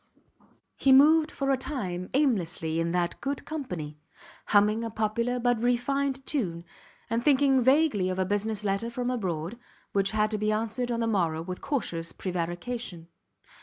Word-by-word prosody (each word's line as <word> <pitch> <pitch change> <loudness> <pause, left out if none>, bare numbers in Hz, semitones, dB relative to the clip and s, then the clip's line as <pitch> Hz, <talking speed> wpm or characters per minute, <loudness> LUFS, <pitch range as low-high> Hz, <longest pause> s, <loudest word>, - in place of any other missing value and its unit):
He 270 - +3
moved 305 +4 +6
for 275 -2 -1
a 270 - +3
time 195 -10 -4
aimlessly 175 - +1
in 165 0 0
that 175 -1 -1
good 275 0 -3
company, 175 - -5 0.5
humming 210 +2 +3
a 230 - -3
popular 225 +3 -1
but 245 -2 +1
refined 270 +3 0
tune, 175 - -2 0.4
and 230 +1 -1
thinking 270 -2 +4
vaguely 260 -7 +3
of 185 - -2
a 190 - +1
business 205 +2 -1
letter 200 +3 -1
from 245 +1 -2
abroad, 185 -2 -3 0.3
which 195 -1 +2
had 215 +1 +1
to 215 - -1
be 215 0 +1
answered 225 +3 -2
on 235 0 -1
the - - +1
morrow 170 -7 0
with 180 +1 -6
cautious 170 - -2
prevarication. 175 +1 -4
220 Hz, 160 wpm, -28 LUFS, 180-255 Hz, 0.5 s, moved